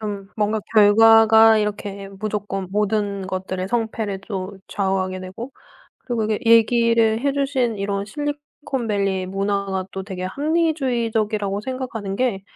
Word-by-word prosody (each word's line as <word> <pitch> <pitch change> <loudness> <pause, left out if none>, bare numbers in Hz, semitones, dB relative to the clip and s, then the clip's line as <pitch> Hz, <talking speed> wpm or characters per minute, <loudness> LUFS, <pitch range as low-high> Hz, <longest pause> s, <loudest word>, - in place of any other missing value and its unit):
좀 200 -2 -5
뭔가 215 0 0
결과가 220 +1 +7
이렇게 205 -1 -4
무조건 205 -3 -3
모든 205 -1 -1
것들의 185 0 -4
성패를 220 -3 -2
또 195 -1 -5
좌우하게 190 -1 -1
되고, 190 +8 -8 0.5
그리고 235 -3 -2
이게 215 -1 0
얘기를 230 -1 +4
해 280 0 +1
주신 270 -5 0
이런 200 0 -2
실리콘밸리의 235 -8 -3
문화가 195 0 -2
또 190 - -5
되게 185 -2 -6
합리주의적이라고 235 - 0
생각하는 230 -5 -5
게 230 -6 -1
210 Hz, 310 characters per minute, -21 LUFS, 195-230 Hz, 0.5 s, 결과가